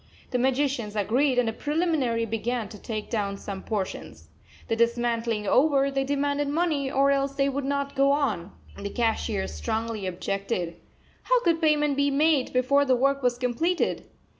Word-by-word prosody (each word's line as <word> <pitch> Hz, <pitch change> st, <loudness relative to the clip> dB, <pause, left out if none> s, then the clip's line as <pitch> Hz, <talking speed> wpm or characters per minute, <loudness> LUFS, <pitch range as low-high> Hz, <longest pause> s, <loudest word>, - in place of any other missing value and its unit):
The 250 Hz, -, 0 dB
magicians 260 Hz, -4 st, 0 dB
agreed, 250 Hz, +6 st, +1 dB
and 245 Hz, -2 st, +3 dB
as 225 Hz, -, -1 dB
a -, -, -18 dB
preliminary 295 Hz, -7 st, 0 dB
began 225 Hz, +1 st, -2 dB
to 210 Hz, -, -11 dB
take 215 Hz, -2 st, -5 dB
down 200 Hz, -3 st, -1 dB
some 195 Hz, -1 st, -6 dB
portions. 200 Hz, -3 st, -5 dB, 0.4 s
The 225 Hz, -, 0 dB
dismantling 235 Hz, -2 st, 0 dB
over, 275 Hz, +3 st, +3 dB
they 270 Hz, 0 st, 0 dB
demanded 285 Hz, +1 st, 0 dB
money, 295 Hz, -2 st, 0 dB
or 275 Hz, +1 st, +3 dB
else 275 Hz, 0 st, 0 dB
they 275 Hz, 0 st, +2 dB
would 275 Hz, 0 st, -3 dB
not 280 Hz, 0 st, -2 dB
go 275 Hz, +1 st, +4 dB
on. 220 Hz, -, 0 dB, 0.3 s
The 200 Hz, -, -4 dB
cashier 220 Hz, -3 st, -1 dB
strongly 225 Hz, -3 st, -3 dB
objected. 185 Hz, -1 st, -3 dB, 0.4 s
How -, -, +3 dB
could 335 Hz, -2 st, +2 dB
payment 300 Hz, -2 st, +2 dB
be 285 Hz, 0 st, +3 dB
made 290 Hz, -1 st, +2 dB
before 265 Hz, +3 st, +3 dB
the 260 Hz, -2 st, +3 dB
work 275 Hz, +2 st, +1 dB
was 245 Hz, -1 st, +1 dB
completed? 255 Hz, +9 st, -1 dB
255 Hz, 165 wpm, -26 LUFS, 225-280 Hz, 0.4 s, go